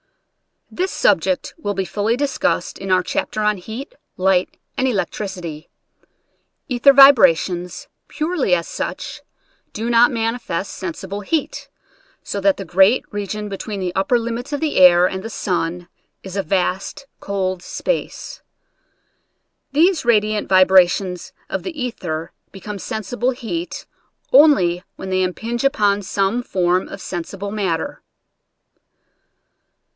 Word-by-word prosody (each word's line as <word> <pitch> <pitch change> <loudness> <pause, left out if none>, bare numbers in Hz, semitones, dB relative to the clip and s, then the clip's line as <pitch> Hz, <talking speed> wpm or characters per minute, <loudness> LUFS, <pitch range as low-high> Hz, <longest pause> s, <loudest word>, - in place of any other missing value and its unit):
This 370 +2 -1
subject 280 - +1
will 205 -11 -3
be 190 0 -1
fully 210 +4 0
discussed 280 -1 -1
in 195 - -6
our 185 0 +3
chapters 215 +4 -2
on 210 -1 +2
heat, 225 - -8 0.2
light, 185 -1 +1 0.2
and 260 - +1
electricity. 190 -8 -4 1.0
Ether 255 +2 +5
vibrations, 180 - +5 0.2
purely 310 - 0
as 170 -1 -3
such, - - -5 0.5
do 230 +3 -2
not 235 +1 +6
manifest 225 -5 -2
sensible 190 +2 -6
heat, 320 - -2 0.5
so 200 - -4
that 195 0 +3
the 195 - -6
great 190 +8 +4
region 205 0 -4
be 200 -1 -5
tween 205 0 -5
the 180 -1 -2
upper 195 +6 +2
limits 235 +3 -4
of 290 - -1
the 315 -2 -1
air 180 -1 +7
and 190 +1 -2
the 225 - -6
sun 175 -4 -2 0.4
is 190 -1 -8
a 200 - +1
vast 195 +8 -2
cold 185 -2 -2
space. - - -4 1.3
These 335 +4 +3
radiant 215 -2 +2
vibra 185 -1 +6
tions 180 -1 -4 0.2
of - - -2
the 335 -5 -7
ether 175 -10 -4 0.2
become 200 +1 -7
sensible 240 +6 -2
heat 285 +8 -5 0.5
only 190 - +5
when 190 - -7
they 185 0 +1
impinge 225 +7 -2
upon 205 -8 +2
some 195 +4 0
form 185 -5 0
of 195 - -9
sensi 175 +2 -6
ble 200 +1 -5
matter. 190 -6 -2
200 Hz, 130 wpm, -20 LUFS, 185-245 Hz, 1.3 s, air